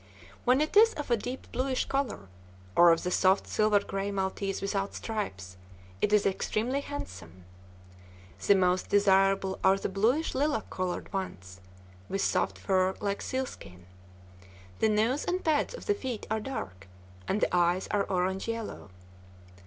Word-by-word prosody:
When 255 +3 +4
it 310 - -1
is 450 +2 +7
of 295 -4 -5
a - - +6
deep 245 +4 -6
bluish 260 0 -1
color, 275 - -2 0.5
or 175 0 +8
of 165 - +1
the 180 - -2
soft 190 +2 +3
silver 210 -1 +2
gray 195 0 -3
maltese 195 0 -2
without 195 0 -2
stripes, 95 - -5 0.4
it 210 - +2
is 210 -1 +4
extremely 225 +7 0
handsome. 90 - -8 1.0
The 200 - +7
most 180 -1 +1
desirable 195 -1 +3
are 190 +1 +5
the 195 - -3
bluish 230 +11 +1
lilac 285 -4 -1
colored 185 +1 -3
ones, 95 - -5 0.5
with 195 - -1
soft - - 0
fur 190 -1 +1
like 200 -1 -2
sealskin. 250 - -5 0.9
The 220 - +3
nose 225 +6 +1
and 365 +1 -2
pads 315 +9 +1
of - - -10
the 415 - +3
feet 260 - -5
are 220 - +1
dark, 95 - -6 0.4
and 205 - 0
the 180 - +1
eyes 175 +1 +2
are 205 -1 +1
orange 190 +2 -1
yellow. 230 - -5
200 Hz, 155 wpm, -29 LUFS, 185-245 Hz, 1.0 s, or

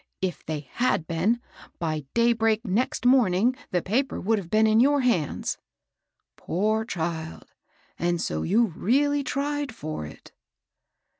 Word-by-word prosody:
If 185 -2 -3
they 155 -2 -4
had 160 - -1
been, 180 +9 +1 0.4
by 155 -3 -3
daybreak 230 -1 +2
next 225 +6 -1
morning 245 -2 +4
the 180 -2 0
paper 260 +8 0
would 220 +2 +1
have 175 -4 -9
been 215 +3 +4
in 220 0 +4
j^ur 280 +2 +4
hands." 180 -12 0 0.4
" - - -56
Poor 215 +5 0
child! 165 -5 -5 0.5
and 175 0 0
so 80 - -2
you 215 - +2
really 285 +8 +2
tried 285 -2 -2
for 155 - -5
it - - -14
215 Hz, 140 wpm, -26 LUFS, 170-245 Hz, 0.5 s, morning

